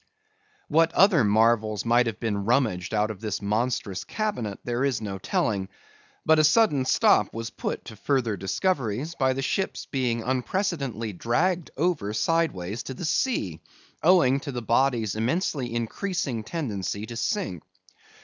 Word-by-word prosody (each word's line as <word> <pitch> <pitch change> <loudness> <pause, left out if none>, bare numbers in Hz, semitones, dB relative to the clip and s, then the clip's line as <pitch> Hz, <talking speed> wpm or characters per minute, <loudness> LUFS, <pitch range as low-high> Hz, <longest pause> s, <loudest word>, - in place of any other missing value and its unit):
What 165 0 +3
other 190 - +5
marvels 110 0 +2
might 120 +1 +4
have 115 - -4
been 105 -4 -1
rummaged 110 -6 +1
out 110 0 +1
of 105 -2 -10
this 105 -4 -2
monstrous 105 -2 -1
cabinet 205 - -3
there 120 +2 -1
is 135 -4 +1
no 100 -3 -5
telling. 95 0 -1 0.6
But 160 0 +5
a - - +5
sudden 155 - +4
stop 105 -5 +4
was 115 0 -4
put - - -4
to 110 - -9
further 120 -1 0
discoveries, 130 - -1
by 130 -5 +1
the 135 +1 -3
ship's 190 +8 -2
being 120 -4 -1
unprecedentedly 130 - -2
dragged 165 - 0
over 145 - 0
sideways 115 - 0
to 130 - -7
the 170 - -5
sea, 150 - 0 0.4
owing 160 -7 +5
to 140 0 -6
the 120 -2 -5
body's 115 -3 +1
immensely 125 +2 -1
increasing 120 - -2
tendency 105 - -3
to 115 - -8
sink. 170 - -2
120 Hz, 150 wpm, -26 LUFS, 105-155 Hz, 0.6 s, other